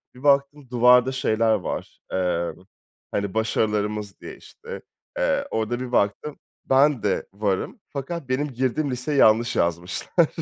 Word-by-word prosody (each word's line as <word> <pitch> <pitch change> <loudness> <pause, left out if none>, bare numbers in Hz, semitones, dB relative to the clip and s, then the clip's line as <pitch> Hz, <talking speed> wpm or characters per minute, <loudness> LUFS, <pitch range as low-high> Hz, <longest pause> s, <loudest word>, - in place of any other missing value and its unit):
Bir 130 - -14
baktım 140 -1 +2
duvarda 125 +1 +5
şeyler 115 -3 +1
var, 90 - -4
eee, 90 -2 0 0.6
hani, 100 -2 -2
"başarılarımız" 105 -2 -1
diye, - - -9
işte, - - -10 0.4
eee, - - +1
orada 110 +2 -1
bir 125 -1 -5
baktım 120 +7 0 0.3
ben 135 -2 +3
de 100 - 0
varım 100 - -2
fakat 140 0 -5
benim 140 +3 0
girdiğim 130 +3 0
liseyi 135 +4 -2
yanlış 115 0 +4
yazmışlar. 90 - +1
120 Hz, 135 wpm, -24 LUFS, 105-140 Hz, 0.6 s, duvarda